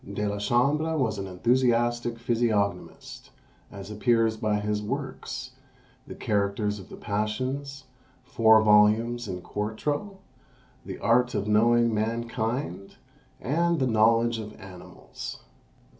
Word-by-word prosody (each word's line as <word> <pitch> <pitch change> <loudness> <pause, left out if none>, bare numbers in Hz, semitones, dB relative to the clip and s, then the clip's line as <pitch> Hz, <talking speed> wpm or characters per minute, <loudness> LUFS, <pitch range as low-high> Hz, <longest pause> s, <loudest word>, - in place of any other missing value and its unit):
De 105 +1 -1
la 100 0 -3
Chambre 145 +9 +1
was 110 -7 0
an 95 - -4
enthusiastic 120 +3 +1
physiognomist, 115 -5 -2 0.4
as 100 +1 -9
appears 115 +1 +2
by 110 -2 -1
his 105 0 -2
works; 130 +2 -5 0.6
"The - - -8
Characters 105 -1 -1
of 95 - -12
the - - -9
Passions," 130 +7 -3 0.4
four 110 -1 +4
volumes 110 +3 +3
in 90 -2 -6
quarto; 145 - -3 0.7
"The - - -6
Art 125 +2 +2
of 100 - -1
Knowing 115 +2 +3
Mankind;" 115 -2 -3 0.4
and 170 +5 0
"The 135 - +1
Knowledge 115 0 +3
of 105 -1 -9
Animals." 90 -3 -10
115 Hz, 115 wpm, -26 LUFS, 105-120 Hz, 0.7 s, four